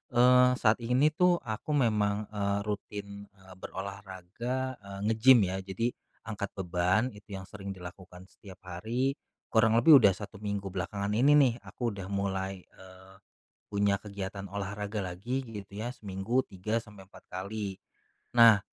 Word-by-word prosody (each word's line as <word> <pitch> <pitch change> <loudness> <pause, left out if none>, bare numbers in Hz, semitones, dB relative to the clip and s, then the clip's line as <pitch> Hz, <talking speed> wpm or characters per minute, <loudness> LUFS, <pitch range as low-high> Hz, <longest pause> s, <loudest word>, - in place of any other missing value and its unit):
eee, 125 +1 +7
saat 110 -2 +3
ini 125 +6 +3
tuh 180 +3 +4
aku 115 +6 -3
memang, 105 -5 +2
eee, 100 -1 0
rutin, 100 -1 -6
eee, 95 -1 -17
berolahraga, 100 +8 -5
eee, 100 -1 -9
nge-gym 115 +1 +6
ya 95 0 -1
jadi 95 +5 -2 0.3
angkat 100 -2 -5
beban 95 +6 +1
itu 105 -1 -10
yang 95 - -6
sering 100 0 -8
dilakukan 90 0 -11
setiap 95 -3 -14
hari 115 +10 -2 0.3
kurang 110 0 +4
lebih 130 +7 +8
udah 100 -6 +5
1 100 0 -9
minggu 100 -1 -3
belakangan 100 +2 -3
ini 125 +8 +4
nih 140 -5 +6
aku 120 -2 -3
udah 100 -3 -6
mulai, 95 -1 -2
eee, 95 0 -16 0.5
punya 100 -1 +1
kegiatan 100 -1 -6
olahraga 100 +1 -4
lagi 105 +10 -3
gitu 100 -4 -9
ya 120 +4 -3
seminggu 105 +3 -1
3 105 +5 -2
sampai 105 -4 -14
4 95 - -17
kali. 100 +1 -5 0.6
Nah 115 -3 +8
100 Hz, 145 wpm, -30 LUFS, 95-115 Hz, 0.6 s, lebih